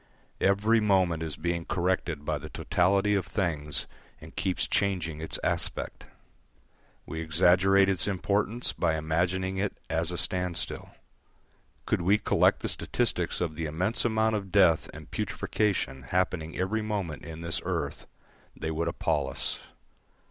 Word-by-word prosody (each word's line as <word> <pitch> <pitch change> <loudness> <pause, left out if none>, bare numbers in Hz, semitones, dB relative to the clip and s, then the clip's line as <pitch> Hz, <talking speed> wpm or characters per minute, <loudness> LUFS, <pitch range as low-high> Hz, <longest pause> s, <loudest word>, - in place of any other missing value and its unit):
Every 105 +4 +3
moment 95 -6 +2
it 80 - -2
is 75 - -5
being 85 +1 -2
corrected 90 -4 -1
by 75 -1 -1
the 80 +2 -8
totality 100 +4 +2
of 100 -4 0
things 75 -7 -1 0.3
and - - -13
keeps 95 -2 0
changing 85 -6 0
its 80 - -2
aspect. - - -1 1.0
We 80 - -5
exaggerate 90 +4 +4
its 95 -2 +1
importance 100 +4 0
by 80 -2 +1
imagining 90 +4 0
it 100 +1 -1
as 80 +1 +1
a 90 - -2
standstill. 90 0 -1 1.0
Could - - +1
we 95 +5 +4
collect 105 - +3
the - - -2
statistics - - 0
of 80 -3 -1
the 80 0 -2
immense 90 +9 0
amount 110 -1 +2
of 100 -3 -4
death 90 -5 +4
and - - -12
putrefaction 95 -11 -1
happening 90 -3 0
every 95 +5 0
moment 100 -8 -3
in 80 0 -8
this 85 0 -2
earth, - - -3 0.5
they 80 - -3
would 80 +1 -1
appal 85 - 0
us. - - -3
90 Hz, 145 wpm, -28 LUFS, 80-100 Hz, 1.0 s, exaggerate